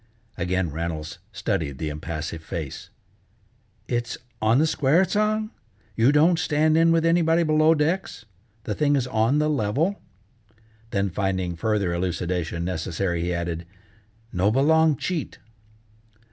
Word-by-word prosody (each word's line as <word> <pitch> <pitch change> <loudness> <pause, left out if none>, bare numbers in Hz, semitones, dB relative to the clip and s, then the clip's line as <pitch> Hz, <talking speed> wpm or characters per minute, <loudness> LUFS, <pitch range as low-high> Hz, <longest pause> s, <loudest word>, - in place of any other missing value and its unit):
Again 90 -1 -1
Reynolds 80 0 -4
studied 70 -4 -2
the 80 - -3
impassive 80 +1 -5
face. 80 -4 -6 1.0
"It's 120 -1 -2 0.2
on 110 +3 +4
the 155 - +4
square, 155 +3 +3
Tsang? 215 +2 0 0.4
You 115 +5 +4
don't 160 +3 +4
stand 155 -1 +2
in 165 +1 +5
with 165 0 +2
anybody 165 0 +3
below 155 0 +4
decks? 160 -4 -1 0.4
The 105 - -2
thing 145 +6 +2
is 135 -3 +1
on 115 +3 +1
the 150 0 +2
level?" 150 - 0 0.9
Then 100 -3 -1
finding 95 -2 -1
further 100 -1 0
elucidation 85 -1 -2
necessary, 85 0 -2
he 90 +1 -1
added, 85 -1 -3 0.7
"No 95 +3 +2
belong 155 +5 +3
cheat!" 170 -2 -3
110 Hz, 130 wpm, -24 LUFS, -, 1.0 s, in